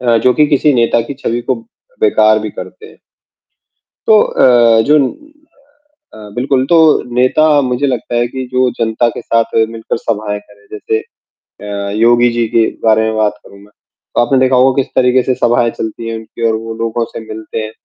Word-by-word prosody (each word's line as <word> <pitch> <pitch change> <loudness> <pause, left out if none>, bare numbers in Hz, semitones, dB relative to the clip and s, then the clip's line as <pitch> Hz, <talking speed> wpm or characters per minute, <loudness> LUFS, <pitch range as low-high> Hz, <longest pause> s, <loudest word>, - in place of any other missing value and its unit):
अ, - - +4
जो 125 +2 +2
कि 150 -1 +3
किसी 145 0 +2
नेता 120 -1 +2
की - - -3
छवि 120 +1 -2
को - - +1 0.5
बेकार 110 - +3
भी 110 0 -5
करते - - -10
हैं। - - -18 1.1
तो 215 -1 +6
अ, 120 -3 +4
जो 150 +1 +5
न 135 -3 +2 1.0
अ, - - -13 0.2
बिल्कुल, 130 +1 0
तो 170 +3 +3 0.4
नेता 130 +5 +2 0.2
मुझे 130 +2 -1
लगता 120 -1 -3
है 120 0 +1
कि 130 +1 -6
जो 130 0 +2
जनता 115 +1 +1
के - - -7
साथ 115 0 -1
मिलकर 115 0 -4
सभाएँ 105 -2 -3
करे, 100 0 -23
जैसे 110 +1 -2 0.4
अ, 100 -1 -7
योगी 120 +1 +4
जी 115 -1 -1
के 115 -1 +4 0.2
बारे 110 -1 +3
में 110 0 -1
बात 105 -1 +1
करूँ 100 - -15
मैं, 105 +1 -19 0.4
तो - - +3
आपने 130 +2 +2
देखा 130 0 +2
होगा 130 +1 +3
किस 130 - -7
तरीके 125 0 +3
से 130 - -1
सभाएँ 120 0 +1
चलती 115 +1 -6
हैं 115 - -4
उनकी 115 +1 -4
और 110 - 0
वो 115 - -5
लोगों 115 +1 -2
से - - -7
मिलते 110 +1 -6
हैं। 110 - -7
115 Hz, 195 wpm, -14 LUFS, 110-130 Hz, 1.1 s, तो